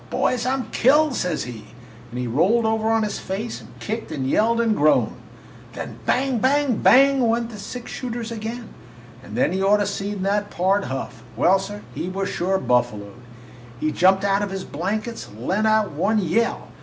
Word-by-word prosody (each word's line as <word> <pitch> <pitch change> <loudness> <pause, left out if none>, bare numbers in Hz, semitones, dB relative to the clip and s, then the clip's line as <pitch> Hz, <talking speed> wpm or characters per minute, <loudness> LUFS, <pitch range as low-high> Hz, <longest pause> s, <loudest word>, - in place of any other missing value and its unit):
'Boys, 250 -1 0
I 260 - +2
'm 265 - -3
killed!' 295 +3 +4
says 180 -8 -1
he, 115 -3 -8 0.5
and 125 +1 -6
he 125 - -2
rolled 185 - +2
over 220 0 +1
on 225 0 +2
his 210 - -3
face 210 +5 -5
and - - -14
kicked 220 -4 -4
and 135 -4 -2
yelled 230 +10 +2
and 225 -2 +2
groaned. 150 -2 +3 0.6
Then - - -7
bang! 260 -1 +1
bang! 270 -1 +2
bang! 270 -1 +5
went 235 +1 0
the 210 - -9
six 245 +4 -7
shooters 235 -2 -5
again; 230 +1 -6 0.5
and 130 - -8
then 170 - +2
you 190 +1 +1
ought 205 - +6
to 210 - +1
have 205 - 0
seen 200 -1 -4
that 205 +1 0
Pard 195 +3 +1
Huff! 130 -3 -5
Well, 180 - +4
sir, 205 +2 -7
he 180 - -4
was 195 +1 -2
sure 190 +2 0
buffaloed! 115 - -1 0.6
He 155 - 0
jumped 190 +5 +3
out 200 0 +2
of 205 - -2
his 195 -1 -4
blankets 215 +9 -4
and 110 +4 -11
let 215 +3 +1
out 215 -1 +2
one 180 +9 +1
yell. 210 +4 0
205 Hz, 195 wpm, -22 LUFS, 180-230 Hz, 0.6 s, ought